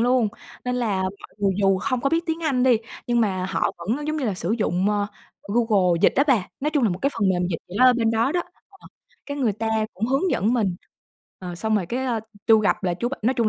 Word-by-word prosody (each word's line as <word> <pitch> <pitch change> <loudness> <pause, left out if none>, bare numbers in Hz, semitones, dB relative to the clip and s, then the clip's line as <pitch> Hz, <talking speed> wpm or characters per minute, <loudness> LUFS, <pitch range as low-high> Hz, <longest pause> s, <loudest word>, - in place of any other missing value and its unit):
luôn, 245 -2 +3 0.4
nên 250 0 -1
là 205 -6 0
mọi 190 +1 -6
người 200 -1 +2
dù 195 -1 +3
không 255 +4 -1
có 275 - 0
biết 330 +1 +2
tiếng 325 +1 -2
Anh 265 -5 +1
đi, 250 -3 +5 0.3
nhưng 240 -1 +2
mà 185 -4 0
họ - - +1
vẫn, 235 - -2
giống 310 0 -1
như 280 - -2
là, 205 -4 0
sử 180 +3 -2
dụng, 190 -1 +1
ơ, 205 -1 0 0.4
Google 200 -5 +2
dịch - - +6
á 280 - +4
bà, 235 -10 +2
nói 300 +2 0
chung 290 -4 +1
là - - +4
một 175 - -3
cái 280 - +2
phần 205 -4 +1
mềm 180 -1 +1
dịch 165 - -2
gì 185 - -7
đó 255 - +6
ở 255 - +7
bên 230 -2 +1
đó 230 +6 +1
đó. 350 - +1 0.3
Ờ, 390 - -18 0.4
cái 285 - -4
người 245 -7 +1
ta 220 +2 -3 0.3
cũng 215 +5 -2
hướng 275 +8 +1
dẫn 205 +7 +1
mình, 195 -7 0 0.6
ờ, 180 -2 -6
xong 220 +4 0
rồi 185 - -1
cái, 255 +8 -2
ơ, 230 -3 0 0.3
tui 220 -2 +6
gặp 200 - +1
là 175 -1 +1
chú 235 +7 -2
b 275 - -12
nói 250 +5 +2
chung 230 -3 +2
225 Hz, 265 wpm, -23 LUFS, 195-255 Hz, 0.6 s, ở